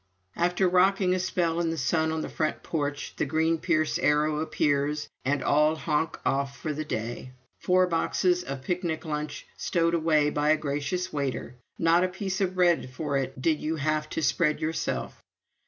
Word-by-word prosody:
After 180 Hz, +2 st, +2 dB
rocking 185 Hz, +1 st, +3 dB
a 185 Hz, -, 0 dB
spell 170 Hz, -2 st, 0 dB
in 170 Hz, -1 st, +1 dB
the 165 Hz, -, -2 dB
sun 160 Hz, +4 st, +1 dB
on 160 Hz, 0 st, -2 dB
the -, -, -4 dB
front 155 Hz, -1 st, -2 dB
porch, 145 Hz, -3 st, -3 dB
the -, -, +1 dB
green 160 Hz, +2 st, +1 dB
Pierce 155 Hz, -3 st, +1 dB
Arrow 150 Hz, +1 st, +2 dB
appears, 150 Hz, -1 st, 0 dB, 0.2 s
and 140 Hz, +2 st, 0 dB
all 150 Hz, +2 st, +3 dB
honk 160 Hz, 0 st, -1 dB
off 140 Hz, 0 st, 0 dB
for 155 Hz, -, -3 dB
the 155 Hz, +2 st, -3 dB
day 120 Hz, -1 st, -5 dB, 0.3 s
four 185 Hz, 0 st, +3 dB
boxes 180 Hz, +1 st, +1 dB
of 135 Hz, -3 st, -6 dB
picnic 170 Hz, 0 st, -2 dB
lunch 150 Hz, -1 st, -4 dB
stowed 170 Hz, -1 st, +1 dB
away 155 Hz, -3 st, +3 dB
by 150 Hz, +1 st, +1 dB
a 155 Hz, -, +5 dB
gracious 150 Hz, +5 st, -2 dB
waiter; 140 Hz, -4 st, -3 dB, 0.2 s
not 165 Hz, +2 st, +4 dB
a -, -, +3 dB
piece 190 Hz, +1 st, -3 dB
of 185 Hz, -1 st, 0 dB
bread 175 Hz, -7 st, +3 dB
for 140 Hz, +2 st, -3 dB
it 135 Hz, -1 st, -2 dB
did 155 Hz, +3 st, +1 dB
you 160 Hz, +1 st, -2 dB
have 155 Hz, 0 st, -1 dB
to 160 Hz, -, -3 dB
spread 150 Hz, +4 st, +2 dB
yourself. 160 Hz, +1 st, -3 dB
155 Hz, 180 wpm, -27 LUFS, 150-175 Hz, 0.3 s, a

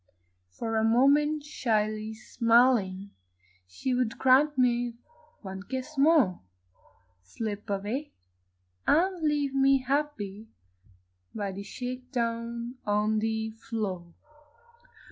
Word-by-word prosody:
For 225 Hz, -, -3 dB
a 220 Hz, -, +2 dB
moment 285 Hz, +6 st, +3 dB
shyly 215 Hz, -6 st, -1 dB
smiling, 225 Hz, -4 st, +2 dB, 0.6 s
She 95 Hz, -, -3 dB
would 245 Hz, -2 st, 0 dB
grant 270 Hz, +3 st, +4 dB
me 245 Hz, -1 st, +2 dB, 0.5 s
one 190 Hz, -1 st, -6 dB
kiss 260 Hz, +7 st, -6 dB
more 280 Hz, -, +4 dB, 0.8 s
Slip 205 Hz, -, -6 dB
away 210 Hz, +9 st, -3 dB, 0.8 s
and 360 Hz, +3 st, +3 dB
leave 295 Hz, -3 st, 0 dB
me 270 Hz, -1 st, +4 dB
happy 240 Hz, -7 st, -2 dB, 0.9 s
By 205 Hz, -2 st, -2 dB
the 195 Hz, +1 st, -7 dB
shake 250 Hz, +4 st, -6 dB
down 235 Hz, 0 st, -3 dB
on 210 Hz, +1 st, +1 dB
the 220 Hz, 0 st, -1 dB
floor. 205 Hz, -6 st, -5 dB
235 Hz, 100 wpm, -28 LUFS, 210-270 Hz, 0.9 s, grant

